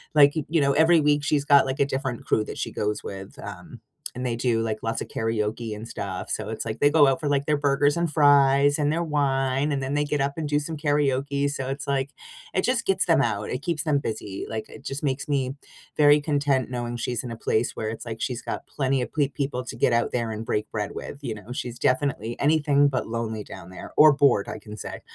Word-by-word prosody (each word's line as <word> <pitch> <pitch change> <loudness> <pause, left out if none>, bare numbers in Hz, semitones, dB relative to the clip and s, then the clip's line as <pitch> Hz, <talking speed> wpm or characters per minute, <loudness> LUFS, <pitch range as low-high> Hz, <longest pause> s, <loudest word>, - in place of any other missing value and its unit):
like, 145 -1 +7
you 160 0 +2
know, 140 0 +3
every 160 +2 +5
week 145 -1 +2
she's 145 -1 +1
got, 140 -2 +6
like, 130 0 -3
a 140 - +4
different 135 -3 -3
crew 110 - +2
that - - -7
she - - -3
goes 105 0 -2
with, 95 -1 -8
um, - - -9 0.3
and 125 - -4
they 120 -2 0
do, 115 -1 +1
like, 110 -1 -2
lots 115 0 -2
of - - -5
karaoke 110 0 -2
and 110 +2 -8
stuff. 95 -2 -5
So, 105 - -3
it's, 110 - -4
like, 110 0 -4
they 145 - +5
go 150 -1 +6
out 135 +1 +2
for, 150 -3 -2
like, 140 0 +1
their 150 - +2
burgers 145 0 +2
and 170 -2 0
fries 145 -1 +5
and 145 0 +2
their 170 +2 0
wine, 135 -2 +1
and 135 -1 -1
then 135 +2 -2
they 145 0 +2
get 145 0 -1
up 140 0 0
and 155 -3 -3
do 145 0 +2
some 160 +2 -5
karaoke. 145 -1 +1
So 135 -2 -3
it's, 135 +1 -4
like 140 -1 0 0.5
it 185 - +2
just 245 -1 +1
gets 190 -1 +2
them 165 -5 +4
out, 105 -4 -1
it 125 - -3
keeps 165 -3 -1
them 150 -3 +2
busy, 105 -6 -5
like, 110 -1 -4
it - - -13
just 135 +2 -5
makes 140 0 -1
me 135 -2 -1 0.4
very 145 0 +6
content 140 -4 0
knowing 120 -1 -3
she's 120 +1 -2
in 125 - -6
a 115 - -6
place 115 +1 0
where 110 - -3
it's, 110 - -6
like, 115 -2 -6
she's 120 +1 -3
got - - -5
plenty 135 -1 0
of - - -8
ple 145 -3 +2
people 135 -3 -3
to 125 - -7
get 120 - +2
out 115 - +1
there 115 -2 -1
and 110 +1 -5
break 105 -1 -2
bread 105 -2 -3
with, 140 - -7
you 120 -5 -4
know? 105 +3 -11
She's 125 -1 -5
definitely 125 -4 0
anything 145 -1 +3
but 130 -2 -1
lonely 110 -2 -3
down 85 - -11
there 90 - -10
or 155 0 +8
bored, 140 -8 +3
I - - -5
can 105 0 -10
say. - - -7
135 Hz, 250 wpm, -25 LUFS, 115-145 Hz, 0.5 s, or